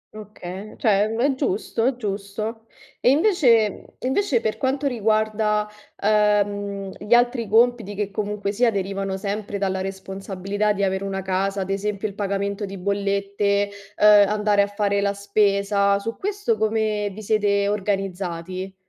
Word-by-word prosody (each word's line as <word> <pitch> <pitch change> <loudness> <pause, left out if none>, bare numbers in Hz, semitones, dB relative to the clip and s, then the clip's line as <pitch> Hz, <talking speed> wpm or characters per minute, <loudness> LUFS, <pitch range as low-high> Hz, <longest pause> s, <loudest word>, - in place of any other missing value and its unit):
Oka 205 -1 -8
cioè, 210 -2 +2
è 270 +3 +2
giusto, 230 -3 -1
è 265 - +1
giusto. 215 +1 -5 0.3
E 245 - +3
invece 270 - +4
mhmm, - - -13 0.2
invece, 265 - +1
per 215 - -2
quanto 270 +2 -1
riguarda 215 -3 +1 0.4
uhm, 205 -2 +1
gli 240 +3 +3
altri 240 -2 +2
compiti 225 -1 +2
che 205 -1 -2
comunque 205 -1 -2
sia 235 +3 +3
derivano 195 -1 -2
sempre 200 +1 -3
dalla 190 -1 -1
responsabilità 195 +1 -3
di 200 -1 -1
avere 190 0 0
una 195 -1 -3
casa, 195 +1 -1
ad 190 +1 -3
esempio 205 +1 -2
il 200 - -8
pagamento 200 0 -2
di 195 0 -7
bollette, 200 +1 0 0.3
uhm, 210 - +3 0.2
andare 210 -1 +2
a 200 - +2
fare 200 -1 0
la 200 0 +1
spesa. 200 0 +2
Su 230 +3 -4
questo 400 - -1
come 215 -1 0
vi 215 +2 -9
siete 200 -1 +2
organizzati? 190 -2 -3
205 Hz, 145 wpm, -23 LUFS, 195-215 Hz, 0.4 s, invece